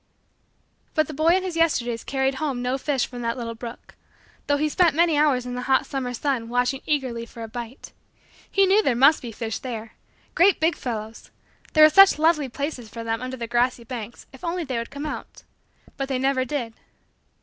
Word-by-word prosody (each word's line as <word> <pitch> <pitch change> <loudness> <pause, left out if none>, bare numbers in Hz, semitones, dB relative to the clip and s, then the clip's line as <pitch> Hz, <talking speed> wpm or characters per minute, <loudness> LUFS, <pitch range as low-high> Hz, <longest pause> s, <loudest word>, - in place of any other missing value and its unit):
But 310 -1 +3
the 310 - -8
boy 320 +4 +3
in 375 - 0
his 365 -3 -4
Yesterdays 245 -8 +1
carried 270 0 0
home 270 -5 -2
no 255 +2 -1
fish 275 -3 0
from 245 -1 -8
that 230 +1 -2
little 230 -2 -4
brook; 230 +1 -10 0.5
though 285 - +2
he 305 +1 +1
spent 335 0 +3
many 335 -1 +3
hours 290 -4 +2
in 250 - -5
the 250 - -3
hot 265 - +3
summer 265 -3 -3
sun 245 -3 -2
watching 245 +3 0
eagerly 260 -6 -1
for 235 0 -9
a - - -5
bite. 240 +3 -8 0.6
He 395 - +4
knew 395 +3 +4
there 270 - +1
must 275 +6 +5
be 240 - -6
fish 225 +1 -4
there 225 -3 -6 0.4
great 375 +2 +4
big 325 +2 +2
fellows 220 -2 -6 0.4
there 310 - +7
were 310 - +9
such 390 0 +7
lovely 305 -3 +2
places 260 -3 -5
for 230 +1 -7
them 225 +1 -2
under 255 +1 -5
the 235 - -4
grassy 240 +1 0
banks 235 -2 -8
if 265 - -14
only 345 +1 -2
they 260 -5 -3
would 230 - -5
come 285 +1 -6
out 300 - -7 0.5
but 275 - -2
they 265 - 0
never 260 0 +1
did. 245 -4 -3
260 Hz, 205 wpm, -24 LUFS, 235-305 Hz, 0.6 s, were